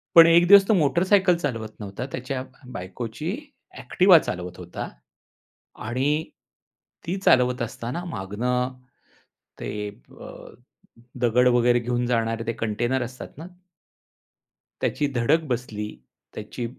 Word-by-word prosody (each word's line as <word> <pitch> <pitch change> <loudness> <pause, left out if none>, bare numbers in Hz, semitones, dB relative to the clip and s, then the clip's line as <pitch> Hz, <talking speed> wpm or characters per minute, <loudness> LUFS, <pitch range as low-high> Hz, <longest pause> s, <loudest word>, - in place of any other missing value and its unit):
पण 165 0 +10
एक 170 +1 +5
दिवस 200 0 +8
तो 220 - +4
मोटरसायकल 180 +3 +3
चालवत 115 -9 -3
नव्हता. 105 +3 -6
त्याच्या 130 0 -4 0.3
बायकोची 115 - -5 0.5
ऍक्टिवा 185 -1 +5
चालवत 90 - -5
होता 90 -1 -6 1.0
आणि 145 +6 0 0.8
ती 185 - -1
चालवत 125 -1 +4
असताना 120 +7 -4
मागनं 125 - -2 0.9
ते 105 0 -4
अ, - - -14 0.9
दगड 125 +1 +4
वगैरे 120 0 +4
घेऊन 120 +1 -1
जाणारे 115 -1 0
ते 115 - 0
कंटेनर 120 +3 -1
असतात 125 +3 -9
ना? 160 - -8 1.4
त्याची 145 - 0
धडक 145 +8 +2
बसली. 110 -4 -4 0.4
त्याची 110 +3 -6
125 Hz, 110 wpm, -24 LUFS, 115-150 Hz, 1.4 s, पण